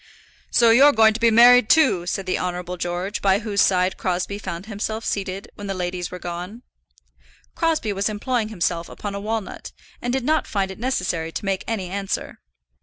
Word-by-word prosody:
"So 235 Hz, -1 st, +5 dB
you're 280 Hz, +5 st, +7 dB
going 220 Hz, -1 st, +5 dB
to 225 Hz, -, -5 dB
be 230 Hz, 0 st, +4 dB
married, 240 Hz, +1 st, +7 dB
too," 255 Hz, -, +4 dB
said 195 Hz, +1 st, -2 dB
the 185 Hz, -, -1 dB
Honourable 180 Hz, 0 st, -3 dB
George, 180 Hz, +3 st, -3 dB
by 195 Hz, -1 st, +3 dB
whose 205 Hz, -3 st, 0 dB
side 185 Hz, 0 st, +2 dB
Crosbie 185 Hz, +2 st, -2 dB
found 190 Hz, -2 st, -6 dB
himself 220 Hz, +1 st, -4 dB
seated 195 Hz, -1 st, -4 dB
when 205 Hz, -, -8 dB
the 195 Hz, -, -3 dB
ladies 180 Hz, -1 st, -3 dB
were 180 Hz, -, -7 dB
gone. 180 Hz, +7 st, -7 dB, 0.9 s
Crosbie 320 Hz, -, 0 dB
was 200 Hz, +2 st, -1 dB
employing 220 Hz, +1 st, -2 dB
himself 170 Hz, -4 st, -2 dB
upon 205 Hz, -1 st, -6 dB
a 200 Hz, -, -4 dB
walnut, 220 Hz, 0 st, -4 dB, 0.3 s
and 245 Hz, -, -2 dB
did 265 Hz, 0 st, -1 dB
not 310 Hz, +4 st, +1 dB
find 195 Hz, -2 st, -1 dB
it 190 Hz, -, -10 dB
necessary 180 Hz, -10 st, -2 dB
to 200 Hz, -, -5 dB
make 195 Hz, -1 st, -1 dB
any 215 Hz, -5 st, -2 dB
answer. 195 Hz, +2 st, -4 dB
200 Hz, 185 wpm, -22 LUFS, 180-225 Hz, 0.9 s, you're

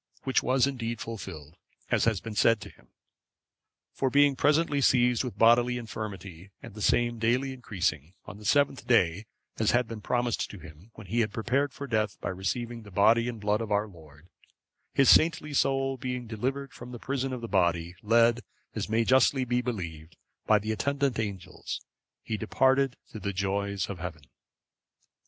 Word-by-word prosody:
Which 130 Hz, -, +2 dB
was 130 Hz, 0 st, +3 dB
indeed 115 Hz, -4 st, -3 dB
fulfilled, 90 Hz, -8 st, -8 dB, 0.3 s
as -, -, +3 dB
had 110 Hz, -6 st, 0 dB
been 115 Hz, -, -6 dB
said 115 Hz, +2 st, +3 dB
to -, -, -9 dB
him; -, -, -24 dB, 1.1 s
for 135 Hz, -, 0 dB
being 145 Hz, +1 st, +4 dB
presently 150 Hz, 0 st, +2 dB
seized 125 Hz, -2 st, +3 dB
with 120 Hz, -6 st, -6 dB
bodily 120 Hz, +2 st, +4 dB
infirmity, 100 Hz, -6 st, -7 dB
and -, -, -11 dB
the 105 Hz, -, -9 dB
same 120 Hz, +2 st, +2 dB
daily 125 Hz, +4 st, +1 dB
increasing, 90 Hz, -, -3 dB
on 100 Hz, -, -9 dB
the -, -, -13 dB
seventh 140 Hz, +3 st, +2 dB
day, 100 Hz, -3 st, +2 dB, 0.3 s
as 110 Hz, -, +2 dB
had 120 Hz, 0 st, +2 dB
been 110 Hz, -2 st, -7 dB
promised 120 Hz, 0 st, -1 dB
to 100 Hz, -, -9 dB
him, 80 Hz, +4 st, -14 dB
when 105 Hz, -, -11 dB
he 115 Hz, +6 st, -1 dB
had 110 Hz, -2 st, +1 dB
prepared 130 Hz, +6 st, 0 dB
for 140 Hz, -, -7 dB
death 110 Hz, -6 st, -1 dB
by -, -, -3 dB
receiving 115 Hz, +6 st, -3 dB
the 105 Hz, -, -13 dB
Body 115 Hz, +5 st, +3 dB
and 115 Hz, -2 st, -6 dB
Blood 105 Hz, +1 st, +1 dB
of 110 Hz, -2 st, -5 dB
our 105 Hz, +1 st, +1 dB
Lord, 80 Hz, -4 st, -16 dB, 0.6 s
his 135 Hz, -, +3 dB
saintly 155 Hz, -2 st, +4 dB
soul 135 Hz, -1 st, +1 dB
being 125 Hz, -1 st, -4 dB
delivered 130 Hz, +5 st, -3 dB
from 120 Hz, +1 st, -10 dB
the -, -, -6 dB
prison 135 Hz, +1 st, -2 dB
of 125 Hz, -2 st, -5 dB
the 115 Hz, -, -5 dB
body, 85 Hz, -4 st, +1 dB
led, 115 Hz, +2 st, +4 dB, 0.3 s
as -, -, -4 dB
may 115 Hz, +1 st, +2 dB
justly 130 Hz, +2 st, +3 dB
be 125 Hz, 0 st, 0 dB
believed, 85 Hz, -10 st, -6 dB, 0.3 s
by 110 Hz, -, +6 dB
the 110 Hz, +2 st, -3 dB
attendant 140 Hz, +2 st, -1 dB
angels, 95 Hz, -4 st, -5 dB, 0.4 s
he 110 Hz, -, -3 dB
departed 130 Hz, +4 st, +2 dB
to 110 Hz, -, -7 dB
the 100 Hz, 0 st, -3 dB
joys 100 Hz, +1 st, -1 dB
of 95 Hz, -3 st, -6 dB
Heaven. 85 Hz, -4 st, -6 dB
115 Hz, 180 wpm, -28 LUFS, 100-125 Hz, 1.1 s, by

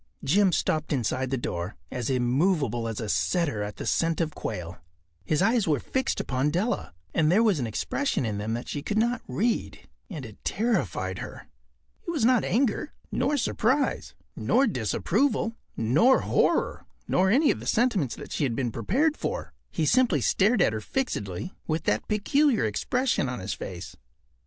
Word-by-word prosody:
Jim 190 Hz, +7 st, +4 dB
stopped 155 Hz, -2 st, 0 dB
inside 130 Hz, -1 st, 0 dB
the 135 Hz, -, 0 dB
door, 90 Hz, -5 st, -4 dB, 0.2 s
as 125 Hz, -1 st, -3 dB
immovable 130 Hz, -, +1 dB
as 115 Hz, -2 st, -4 dB
a 110 Hz, -, -3 dB
setter 105 Hz, -, 0 dB
at 105 Hz, 0 st, -4 dB
the -, -, -6 dB
scent 165 Hz, -1 st, +1 dB
of 160 Hz, -2 st, -1 dB
quail. 90 Hz, -4 st, -5 dB, 0.5 s
His 155 Hz, -, +1 dB
eyes 225 Hz, -1 st, +2 dB
were 150 Hz, -4 st, +2 dB
fixed 265 Hz, -, -1 dB
upon 135 Hz, +2 st, 0 dB
Della, 180 Hz, -, -1 dB, 0.2 s
and 155 Hz, -1 st, +3 dB
there 210 Hz, +6 st, +5 dB
was 205 Hz, -9 st, +3 dB
an 120 Hz, -, -1 dB
expression 145 Hz, -, -1 dB
in 105 Hz, -2 st, -2 dB
them 110 Hz, +2 st, -2 dB
that 120 Hz, -, -5 dB
she 145 Hz, -, -4 dB
could 205 Hz, +8 st, -2 dB
not 235 Hz, +3 st, +1 dB
read, 215 Hz, -, -1 dB, 0.3 s
and 155 Hz, -, -6 dB
it 110 Hz, -2 st, -13 dB
terrified 225 Hz, +2 st, -1 dB
her. -, -, -8 dB, 0.6 s
It -, -, -2 dB
was 310 Hz, -9 st, +1 dB
not 250 Hz, -3 st, +4 dB
anger, 245 Hz, -, 0 dB, 0.2 s
nor 295 Hz, -, +1 dB
surprise, 260 Hz, +2 st, 0 dB, 0.2 s
nor 270 Hz, -, +2 dB
disapproval, 220 Hz, -, 0 dB, 0.2 s
nor 150 Hz, -, +4 dB
horror, -, -, +1 dB, 0.2 s
nor 190 Hz, +1 st, +3 dB
any 280 Hz, +8 st, +4 dB
of -, -, -3 dB
the -, -, -8 dB
sentiments 210 Hz, -, +1 dB
that -, -, -10 dB
she -, -, -1 dB
had 125 Hz, -5 st, 0 dB
been 125 Hz, -3 st, -1 dB
prepared 265 Hz, -, +1 dB
for. -, -, -4 dB, 0.2 s
He 160 Hz, -, -1 dB
simply 235 Hz, -, +3 dB
stared 200 Hz, -, +3 dB
at -, -, +2 dB
her 110 Hz, -, -3 dB
fixedly 105 Hz, -, -3 dB
with 160 Hz, 0 st, -1 dB
that 105 Hz, +1 st, 0 dB
peculiar 250 Hz, -, +2 dB
expression 195 Hz, -, 0 dB
on 125 Hz, -, -4 dB
his 95 Hz, +2 st, -3 dB
face. 90 Hz, -1 st, -7 dB
160 Hz, 175 wpm, -27 LUFS, -, 0.6 s, there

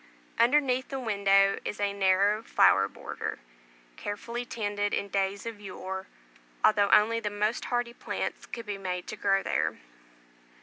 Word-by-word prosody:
Underneath 260 Hz, +1 st, +3 dB
the 270 Hz, -, -3 dB
windows 200 Hz, -4 st, +3 dB
is 210 Hz, -, -4 dB
a 200 Hz, -1 st, 0 dB
narrow 200 Hz, +2 st, +3 dB
flower 95 Hz, -, +4 dB
border, -, -, -6 dB, 0.6 s
carefully 235 Hz, +4 st, -5 dB
tended 205 Hz, -3 st, -2 dB
in 200 Hz, -, -3 dB
days 195 Hz, +1 st, -1 dB
of 225 Hz, -3 st, -6 dB
yore, 190 Hz, -1 st, -6 dB, 0.6 s
although 205 Hz, -2 st, +4 dB
only 230 Hz, +2 st, +5 dB
the 210 Hz, -, -2 dB
most 210 Hz, +2 st, -1 dB
hardy 240 Hz, -1 st, -1 dB
plants -, -, -4 dB
could 235 Hz, -1 st, -7 dB
be 205 Hz, -1 st, -4 dB
made 180 Hz, -2 st, -3 dB
to -, -, -6 dB
grow 195 Hz, -1 st, +1 dB
there. -, -, 0 dB
205 Hz, 145 wpm, -28 LUFS, 195-230 Hz, 0.6 s, only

